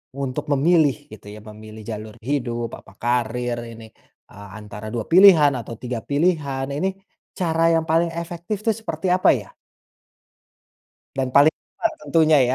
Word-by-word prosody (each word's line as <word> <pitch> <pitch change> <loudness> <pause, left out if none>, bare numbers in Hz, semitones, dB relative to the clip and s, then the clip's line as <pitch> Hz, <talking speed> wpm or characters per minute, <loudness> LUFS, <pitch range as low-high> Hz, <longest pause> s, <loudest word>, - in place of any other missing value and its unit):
untuk 135 -2 -3
memilih, 150 0 +3 0.2
gitu, 105 -1 -13
ya, 110 - -11
memilih 110 +1 -11
jalur 110 -1 -7
hidup, 120 -4 -2
apa 95 - -18
karir 120 0 -1
ini 115 -1 -11 0.4
eee, 100 0 -12
antara 105 0 -9
dua 115 -2 -2
pilihan 170 -5 +7
atau 115 0 -7
tiga 125 -2 -4
pilihan, 145 -3 0
ini 185 +7 0 0.5
cara 165 -2 0
yang 165 - +1
paling 165 +2 +2
efektif 170 +4 -5
tuh 225 - +4
seperti 220 -3 -5
apa, 185 - +4
ya? - - -7 1.7
Dan 130 -1 0
paling 145 +4 +5 0.2
aman 335 - 0
tentunya 160 -2 +3
ya. - - +1
140 Hz, 150 wpm, -22 LUFS, 115-165 Hz, 1.7 s, pilihan